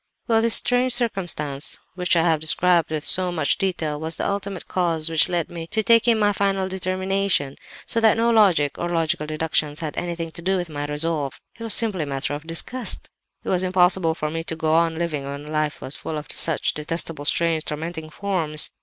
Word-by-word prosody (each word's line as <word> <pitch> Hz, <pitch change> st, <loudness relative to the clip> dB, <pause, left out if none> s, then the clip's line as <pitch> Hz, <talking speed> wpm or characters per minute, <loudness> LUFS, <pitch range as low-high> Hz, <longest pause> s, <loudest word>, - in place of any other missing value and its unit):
"Well, 225 Hz, -2 st, +3 dB
this 230 Hz, 0 st, +1 dB
strange 245 Hz, 0 st, +1 dB
circumstance—which 180 Hz, -, -1 dB
I 165 Hz, -, +3 dB
have 165 Hz, -2 st, +2 dB
described 170 Hz, +1 st, +2 dB
with 155 Hz, -1 st, -3 dB
so 185 Hz, -1 st, +2 dB
much 155 Hz, -4 st, +1 dB
detail—was 160 Hz, -4 st, -2 dB
the -, -, -2 dB
ultimate 200 Hz, 0 st, -4 dB
cause 165 Hz, -3 st, 0 dB
which 160 Hz, -, +4 dB
led 175 Hz, -3 st, -1 dB
me 165 Hz, -1 st, -6 dB
to 220 Hz, +4 st, -1 dB
taking 230 Hz, +1 st, +4 dB
my 205 Hz, -1 st, +2 dB
final 195 Hz, -1 st, 0 dB
determination. 190 Hz, -5 st, 0 dB, 0.3 s
So 230 Hz, -, +2 dB
that 225 Hz, 0 st, +4 dB
no 230 Hz, +1 st, +2 dB
logic, 185 Hz, -10 st, +3 dB
or 175 Hz, -, -2 dB
logical 160 Hz, -3 st, 0 dB
deductions, 155 Hz, -1 st, 0 dB
had 155 Hz, -2 st, -4 dB
anything 170 Hz, -2 st, -4 dB
to 170 Hz, -, -9 dB
do 190 Hz, +2 st, +1 dB
with 175 Hz, -3 st, -4 dB
my 145 Hz, 0 st, -4 dB
resolve;—it 150 Hz, -, -3 dB
was 225 Hz, -2 st, +4 dB
simply 215 Hz, -6 st, +2 dB
a 150 Hz, -, -3 dB
matter 135 Hz, +1 st, -1 dB
of 150 Hz, +2 st, -7 dB
disgust. 235 Hz, +10 st, 0 dB, 0.3 s
"It -, -, -5 dB
was 180 Hz, -1 st, +3 dB
impossible 180 Hz, -2 st, +2 dB
for 150 Hz, -2 st, -3 dB
me 165 Hz, +1 st, -3 dB
to 160 Hz, -, -1 dB
go 160 Hz, -1 st, 0 dB
on 165 Hz, 0 st, +2 dB
living 160 Hz, -4 st, -2 dB
when 140 Hz, +1 st, -6 dB
life 155 Hz, 0 st, -2 dB
was 135 Hz, -, -4 dB
full 155 Hz, -, -5 dB
of 150 Hz, -, -7 dB
such 160 Hz, -2 st, +1 dB
detestable, 150 Hz, -1 st, -3 dB
strange, 165 Hz, 0 st, +1 dB
tormenting 160 Hz, +1 st, -5 dB
forms. 160 Hz, -4 st, +1 dB
165 Hz, 195 wpm, -22 LUFS, 155-190 Hz, 0.3 s, which